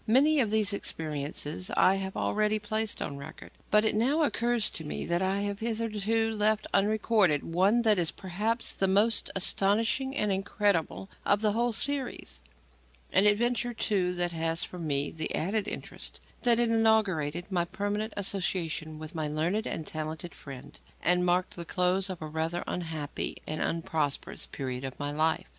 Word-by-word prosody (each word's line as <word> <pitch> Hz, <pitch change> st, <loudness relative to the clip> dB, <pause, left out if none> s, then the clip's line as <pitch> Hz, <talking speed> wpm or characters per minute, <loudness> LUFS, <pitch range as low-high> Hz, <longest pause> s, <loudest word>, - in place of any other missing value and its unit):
Many 285 Hz, +7 st, +5 dB
of 230 Hz, -5 st, +2 dB
these 215 Hz, -1 st, +2 dB
experiences 155 Hz, 0 st, -3 dB
I 185 Hz, -, +6 dB
have 190 Hz, 0 st, -4 dB
already 215 Hz, 0 st, +1 dB
placed 215 Hz, +1 st, -2 dB
on 140 Hz, -, -5 dB
record; 140 Hz, -, -10 dB, 0.2 s
but 210 Hz, +1 st, +4 dB
it 220 Hz, -, +2 dB
now 265 Hz, +9 st, +2 dB
occurs 240 Hz, -5 st, +1 dB
to 160 Hz, -, -4 dB
me 150 Hz, -, -4 dB
that 170 Hz, +1 st, 0 dB
I 190 Hz, +1 st, +1 dB
have 205 Hz, 0 st, -3 dB
hitherto 225 Hz, -1 st, 0 dB
left 215 Hz, 0 st, +1 dB
unrecorded 205 Hz, -5 st, +3 dB
one 195 Hz, +8 st, +2 dB
that 215 Hz, -4 st, +4 dB
is, 170 Hz, -2 st, +2 dB
perhaps, 210 Hz, +5 st, -1 dB
the 195 Hz, -, 0 dB
most 205 Hz, +4 st, +3 dB
astonishing 225 Hz, +8 st, +2 dB
and 210 Hz, -1 st, +1 dB
incredible 190 Hz, -, 0 dB, 0.2 s
of 205 Hz, +1 st, +2 dB
the 215 Hz, -1 st, +3 dB
whole 235 Hz, +3 st, +1 dB
series; 275 Hz, +3 st, -1 dB, 0.7 s
an 195 Hz, +3 st, +5 dB
adventure, 240 Hz, +3 st, +1 dB
too, 185 Hz, -5 st, 0 dB
that 175 Hz, 0 st, +1 dB
has 165 Hz, 0 st, 0 dB
for 180 Hz, -, -6 dB
me 145 Hz, -3 st, -1 dB
the 160 Hz, -1 st, -3 dB
added 200 Hz, +5 st, -1 dB
interest -, -, -6 dB, 0.2 s
that 240 Hz, -1 st, +5 dB
it 240 Hz, -1 st, +3 dB
inaugurated 195 Hz, -7 st, +2 dB
my 175 Hz, -2 st, +1 dB
permanent 205 Hz, +4 st, -2 dB
association 175 Hz, -5 st, -1 dB
with 155 Hz, +1 st, -8 dB
my 155 Hz, -2 st, -2 dB
learned 165 Hz, +8 st, -1 dB
and 160 Hz, -, -4 dB
talented 155 Hz, +2 st, -5 dB
friend, 130 Hz, -, -11 dB, 0.2 s
and 180 Hz, +1 st, +3 dB
marked 180 Hz, +1 st, +1 dB
the 170 Hz, -, -6 dB
close 180 Hz, +2 st, +1 dB
of 180 Hz, -4 st, -5 dB
a -, -, -4 dB
rather 160 Hz, +3 st, -2 dB
unhappy 160 Hz, -4 st, -3 dB
and 155 Hz, -, -3 dB
unprosperous 160 Hz, -3 st, -1 dB
period 130 Hz, -1 st, -5 dB
of 135 Hz, -1 st, -6 dB
my 145 Hz, 0 st, -2 dB
life. 155 Hz, +2 st, +1 dB
195 Hz, 165 wpm, -29 LUFS, 160-215 Hz, 0.7 s, I